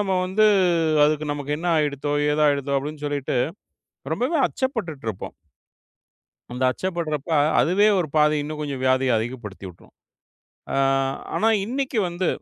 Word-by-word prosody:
நம்ம 195 -2 0
வந்து 215 +4 +3 0.6
அதுக்கு 155 0 0
நமக்கு 145 0 -3
என்னாயிடுத்தோ? 150 -4 0 0.2
ஏதாயிடுத்தோ? 145 -2 +1
அப்டின்னு 150 +1 -7
சொல்லிட்டு 140 -2 -2 0.8
ரொம்பவே 285 +7 0
அச்சப்பட்டுட்டிருப்போம். 160 - -4 1.2
அந்த 125 +1 -3
அச்சப்படுறப்ப, 165 -2 -3 0.3
அதுவே 185 +11 +3
ஒரு 170 - -1
பாதி 150 0 +4
இன்னும் 150 +1 -6
கொஞ்சம் 140 -3 -4
வியாதிய 130 0 +2
அதிகப்படுத்திவிட்ரும். 105 -6 -7 0.8
ஆ, - - 0 0.6
ஆனா 220 - +2 0.2
இன்னைக்கு 260 0 -2
வந்து 175 +1 -2
150 Hz, 110 wpm, -23 LUFS, 135-180 Hz, 1.2 s, பாதி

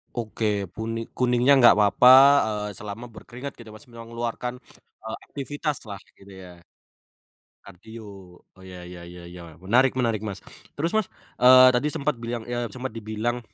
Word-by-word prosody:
Oke. 115 -2 -4 0.3
Kuning 115 +1 -5
kuningnya 125 +2 +3
nggak 120 - +7
apa-apa, 105 +4 +3 0.4
eee, 105 -1 -4
selama 105 +3 -7
berkeringat 125 +5 -9
gitu, 115 -2 -13
Mas, 110 - -12
mengeluarkan, 115 +1 -6 0.5
eee, - - -6
aktivitas 145 +1 -3
lah, 100 -2 -7 0.2
gitu 100 0 -17
ya. 90 -1 -15 1.0
Kardio, 110 +5 -13 0.4
oh, 95 - -24
iya 90 -1 -11
iya 90 0 -11
iya 90 0 -12
iya. 90 0 -11 0.2
Menarik 130 +6 +3
menarik, 115 -3 0
Mas. 100 -1 -7 0.3
Terus 165 +4 0
Mas, 220 -2 0 0.3
eee, 130 0 +8
tadi 125 +4 0
sempet 140 0 -2
bilang, 115 0 -5
eee, 120 0 -4
sempat 130 -1 -6
dibilang, 115 +2 -4
115 Hz, 150 wpm, -24 LUFS, 105-125 Hz, 1.0 s, eee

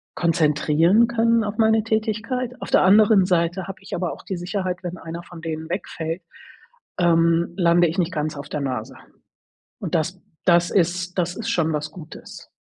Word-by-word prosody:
konzentrieren 165 +4 +3
können 230 -1 +2
auf 210 0 -4
meine 220 0 +4
Tätigkeit. 225 +3 -2
Auf - - -7
der - - +5
anderen 205 0 +5
Seite 175 0 0
habe 195 - -8
ich 195 - -6
aber 175 -1 -2
auch - - -13
die 190 - -4
Sicherheit, 180 0 -3
wenn 180 0 -5
einer 165 +1 -7
von 170 -1 -12
denen 160 -1 -5
wegfällt, 165 -1 -4 0.8
ähm, 170 0 +3
lande 175 -1 +4
ich 165 +3 -3
nicht 175 0 0
ganz 155 -3 -3
auf 140 -1 -8
der 150 - -3
Nase 130 -2 -4 0.8
und - - -5
das 165 +3 -1 0.3
das 175 0 +4
ist 180 0 0
das 175 +1 -1
ist - - -3
schon 160 -2 +1
was 150 0 -3
Gutes. 155 -2 -11
175 Hz, 175 wpm, -22 LUFS, 165-195 Hz, 0.8 s, der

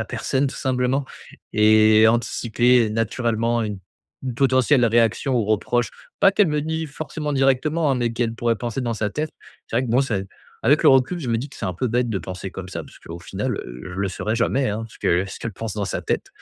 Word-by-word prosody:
la - - -2
personne, 135 +1 -1
tout - - -5
simplement 130 +1 0 0.5
et 110 0 +6
anticiper 120 +1 +2
naturellement 115 +1 0
une 105 -2 -4 0.4
une 130 -3 -4
potentielle 130 0 +3
réaction 115 +4 +2
ou 115 - +2
reproche 110 +2 0 0.3
pas 195 - +6
qu'elle 195 -3 +3
me 150 -1 0
dit 160 0 -2
forcément 150 0 -5
directement, 135 +4 +2
hein, - - +2
mais 120 -2 -1
qu'elle 115 -1 -1
pourrait 115 -1 0
penser 120 +2 -4
dans 120 -2 -2
sa 105 -1 -2
tête, 155 +4 -3 0.4
c'est - - -3
vrai 125 - +2
que 115 - -4
bon 125 - +4
c'est 105 -8 -1 0.4
avec 145 +2 +4
le - - +6
recul 135 +7 +4
je 130 - -4
me 115 - +2
dis 135 +6 -4
que: - - -13
«C'est 100 - -4
un 90 - -3
peu 125 - -1
bête 120 +1 0
de 105 -4 -1
penser 95 +1 -6
comme 95 0 -8
ça», 85 -3 -5
parce - - -15
qu'au 85 +1 -9
final, - - -3
heu, - - -7
je 95 - -3
le 100 - 0
saurai 100 +4 -2
jamais, 130 +3 +1
hein, 110 +2 -3
ce - - -17
que 90 +3 +2
ce 95 - -8
qu'elle 115 - -5
pense 110 +2 -5
dans 105 -1 -2
sa - - -3
tête, - - -2
120 Hz, 235 wpm, -22 LUFS, 110-135 Hz, 0.5 s, et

